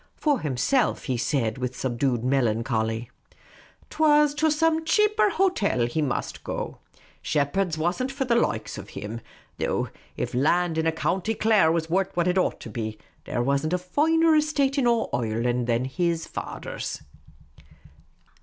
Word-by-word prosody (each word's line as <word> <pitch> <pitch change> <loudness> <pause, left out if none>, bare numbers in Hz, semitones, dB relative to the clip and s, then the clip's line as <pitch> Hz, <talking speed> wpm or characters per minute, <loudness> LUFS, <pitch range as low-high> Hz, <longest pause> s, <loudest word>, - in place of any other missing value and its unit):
For 290 -5 +1
himself, 150 - +1
he 130 - -1
said, 120 -2 -1
with 125 0 -3
subdued 125 -1 -1
melancholy, 115 -2 0 0.4
" - - -26
't 305 - -12
was 300 -1 +5
to 315 +2 +2
some 320 +1 +2
cheaper 425 +5 +3
hotel 355 - +1
he 120 +7 -1
must 135 -4 -3
go; - - -5 0.4
Shepheard's 155 +4 0
was 175 +7 0
n't 260 +1 -1
for 270 0 -2
the 245 - +1
likes 235 - -1
of - - -10
him; 110 +3 -5 0.4
though - - -1 0.3
if - - -3
land 160 +5 +2
in 160 0 +2
County 190 +6 -1
Clare 215 -8 +4
was 165 -1 0
wort' 190 +3 +1
what 175 0 +2
it 180 +1 +2
ought - - 0
to - - -8
be, 110 0 -4 0.3
there 120 - -1
wasn't 140 +5 0
a - - +3
finer 315 - +3
estate 290 -2 +2
in 250 - +2
all 235 -1 +2
Oireland 120 +1 0
than 120 +1 +1
his 170 +4 -1
fader's." - - -6
165 Hz, 160 wpm, -25 LUFS, -, 0.4 s, was